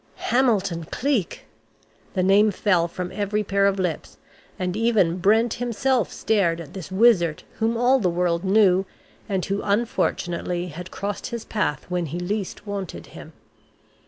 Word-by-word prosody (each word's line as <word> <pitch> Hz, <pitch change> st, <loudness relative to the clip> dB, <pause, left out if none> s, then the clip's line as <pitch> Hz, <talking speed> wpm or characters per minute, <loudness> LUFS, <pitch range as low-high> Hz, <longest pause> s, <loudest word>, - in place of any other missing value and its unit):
"Hamilton 205 Hz, -10 st, +2 dB
Cleek!" 245 Hz, -, -2 dB, 0.7 s
The 185 Hz, -, +1 dB
name 200 Hz, +3 st, +5 dB
fell 185 Hz, -4 st, +1 dB
from 180 Hz, +1 st, -5 dB
every 210 Hz, +1 st, -1 dB
pair 200 Hz, 0 st, +2 dB
of 200 Hz, 0 st, +1 dB
lips, 180 Hz, -5 st, -3 dB, 0.4 s
and 180 Hz, 0 st, -2 dB
even 215 Hz, -6 st, +2 dB
Brent 220 Hz, +5 st, +3 dB
himself 245 Hz, 0 st, 0 dB
stared 185 Hz, -6 st, +1 dB
at 165 Hz, 0 st, -9 dB
this 190 Hz, -1 st, -8 dB
wizard 190 Hz, -6 st, +3 dB, 0.2 s
whom 225 Hz, +1 st, +1 dB
all 250 Hz, +3 st, +4 dB
the 185 Hz, -6 st, +1 dB
world 170 Hz, 0 st, 0 dB
knew, 190 Hz, -1 st, +4 dB, 0.4 s
and 190 Hz, -3 st, -1 dB
who 200 Hz, +1 st, -2 dB
unfortunately 180 Hz, -4 st, -1 dB
had 175 Hz, +3 st, -8 dB
crossed 200 Hz, 0 st, -4 dB
his 235 Hz, -2 st, -6 dB
path 150 Hz, -10 st, -2 dB
when 180 Hz, -2 st, -2 dB
he 165 Hz, +5 st, -4 dB
least 200 Hz, +3 st, -4 dB
wanted 200 Hz, -3 st, -5 dB
him. -, -, -11 dB
195 Hz, 150 wpm, -23 LUFS, 180-220 Hz, 0.7 s, name